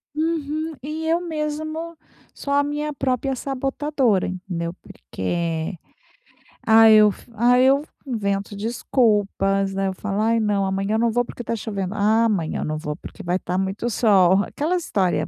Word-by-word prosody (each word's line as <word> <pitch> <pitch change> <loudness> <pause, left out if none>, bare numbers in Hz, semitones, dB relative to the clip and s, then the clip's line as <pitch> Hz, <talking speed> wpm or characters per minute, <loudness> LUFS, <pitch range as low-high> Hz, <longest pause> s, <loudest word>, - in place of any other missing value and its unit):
Uhum. 315 0 -2
E 310 +3 -5
eu 335 +1 +2
mesmo 315 0 -4 0.4
sou 280 - -4
a 285 0 +4
minha 295 +1 -3
própria 265 0 -1
sabotadora, 270 -4 0
entendeu, 180 -2 -4
porque, 165 - -4 0.9
ah, 225 0 +7
eu 215 -1 +7
fu 235 - -15
ah, 245 +3 +4
eu 270 +3 +4 0.2
invento 200 -4 -2
desculpas, 205 -3 +1
né. 195 0 -1
Eu 190 - -2
falo: 205 +2 -3
"Ai, 230 +1 +2
não, 205 -2 +1
amanhã 195 +3 -1
não 230 0 +2
vou 245 +2 +1
porque 240 - -8
tá 230 - -2
chovendo. 200 -3 -4
Ah, 220 +3 +3
amanhã 190 -8 -1
não 155 0 -2
vou 150 -1 -4
porque 205 - -11
vai 180 +1 0
tá 180 +1 -3
muito 195 +5 -2
sol", 200 -4 +4
aquelas 345 +4 -2
história 180 - 0
220 Hz, 155 wpm, -22 LUFS, 195-280 Hz, 0.9 s, ah